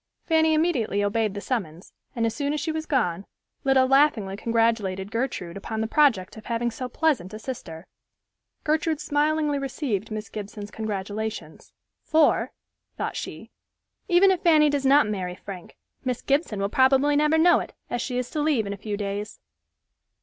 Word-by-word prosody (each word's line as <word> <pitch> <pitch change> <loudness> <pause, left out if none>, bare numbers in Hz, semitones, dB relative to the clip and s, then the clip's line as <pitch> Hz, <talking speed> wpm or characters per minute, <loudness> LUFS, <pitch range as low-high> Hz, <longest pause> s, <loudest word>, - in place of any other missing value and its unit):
Fanny 320 -1 +3
immediately 260 - +1
obeyed 210 0 0
the 205 - -4
summons, 185 -10 -4 0.2
and 230 -1 0
as 225 - 0
soon 285 0 -1
as 300 - -1
she 320 - -2
was 315 0 -4
gone, 195 - 0 0.4
Lida 270 -1 +4
laughingly 260 -8 +3
congratulated 220 -3 0
Gertrude 230 -8 -3
upon 220 +2 -5
the 220 - 0
project 225 -7 +2
of 215 - -11
having 235 0 -1
so 250 +2 -5
pleasant 235 - 0
a - - -5
sister. 190 -9 -7 0.8
Gertrude 315 0 0
smilingly 295 0 +1
received 255 - -3
Miss 215 -1 -5
Gibson's 205 0 -7
congratulations. 215 0 -5 0.3
"For," 315 -2 +2 0.5
thought - - -3
she, - - -7 0.6
"even 375 +1 +5
if 370 - 0
Fanny 305 -3 +5
does 280 -2 0
not 285 +2 +6
marry 185 -4 -3
Frank, 185 -1 -10 0.3
Miss 250 -2 -2
Gibson 275 - 0
will 200 - +1
probably 270 +4 +4
never 300 +2 +3
know 345 +2 +5
it, - - -7 0.2
as 240 - -1
she 250 -1 -3
is 250 -1 -3
to 305 - -1
leave 290 -8 +1
in 200 - -3
a - - -7
few 205 +1 -4
days." 205 0 -4
235 Hz, 170 wpm, -25 LUFS, 205-295 Hz, 0.8 s, not